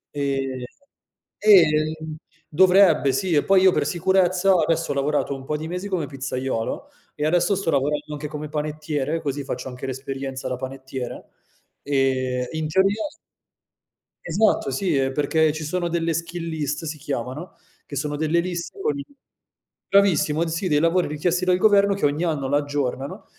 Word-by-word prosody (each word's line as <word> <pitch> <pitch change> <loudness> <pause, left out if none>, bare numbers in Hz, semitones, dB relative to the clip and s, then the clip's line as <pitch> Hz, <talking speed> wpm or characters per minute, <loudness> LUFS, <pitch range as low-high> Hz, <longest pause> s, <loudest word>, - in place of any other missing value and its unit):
Ehm, 135 -2 -2 0.8
eh 205 -4 +7 0.8
dovrebbe 180 -4 +5
sì, 185 +5 0
e 145 - +3
poi 195 -1 +4
io 190 - +7
per - - +1
sicurezza 185 +1 +2
adesso 165 -2 +1
ho - - +1
lavorato 140 +1 0
un 135 - -9
po' 150 +3 -2
di 155 +1 -6
mesi 180 +4 -4
come 180 -6 -1
pizzaiolo, 130 -4 -3 0.3
e 150 - -2
adesso 175 +4 +2
sto 185 -3 -1
lavorando 145 +2 0
anche 150 0 -5
come 150 0 -6
panettiere, 150 0 -2
così 145 -2 -3
faccio 130 -1 -5
anche 125 +1 -7
l'esperienza 135 0 -5
da 125 - -2
panettiere, 130 -1 -7 0.5
ehm, 130 -2 0
in 160 -1 -2
teoria 195 +6 +2 1.2
Esatto, 180 -5 +2
sì 165 +5 0
eh, 135 -1 +1
perché 150 +2 +2
ci 155 +1 -5
sono 175 +2 -1
delle 165 -1 0
skill 170 +1 -4
list 150 -1 -3
si 155 0 -4
chiamano, 140 +3 -5 0.3
che 140 - -7
sono 145 +2 -2
delle 155 +3 +1
liste 175 - -4
con 435 -4 -1
i 280 - -6 0.8
bravissimo, 170 -5 +3
sì, 165 +3 -2
dei 150 -2 +3
lavori 165 +3 +2
richiesti 170 +5 -1
dal 180 0 +3
governo 200 0 +4
che 195 - -1
ogni 145 +3 0
anno 150 -6 -1
l'aggiornano, 145 -1 -2
155 Hz, 160 wpm, -23 LUFS, 140-175 Hz, 1.2 s, eh